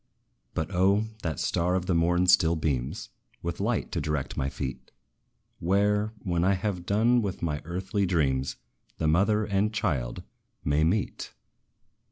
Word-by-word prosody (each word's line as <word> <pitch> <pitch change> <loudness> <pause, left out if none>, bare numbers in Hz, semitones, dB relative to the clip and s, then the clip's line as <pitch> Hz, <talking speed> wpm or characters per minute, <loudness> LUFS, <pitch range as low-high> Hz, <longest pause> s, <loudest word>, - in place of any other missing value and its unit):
But, 80 +5 -2
O! 95 +4 +3 0.2
that 80 -5 -3
STAR 90 +1 +1
of 90 -1 -1
the 95 - +1
morn 85 +2 +3
still 90 -2 +5
beams 70 -6 -2 0.3
With 85 0 -3
light 110 +3 -1
to 85 - -1
direct 75 -2 -2
my 65 - -1
feet 65 -2 -6 0.7
Where, 105 +4 +2
when 85 -2 0
I 95 +2 +3
have 90 -2 -3
done 115 +4 +3
with 100 -5 -4
my 75 -3 -1
earthly 95 +3 -1
dreams, 70 -7 +1 0.4
The 80 - 0
mother 100 +7 +3
and 100 +1 +1
child 80 - -2 0.4
may 75 +1 +2
meet. 95 +6 -1
90 Hz, 150 wpm, -27 LUFS, 80-100 Hz, 0.7 s, still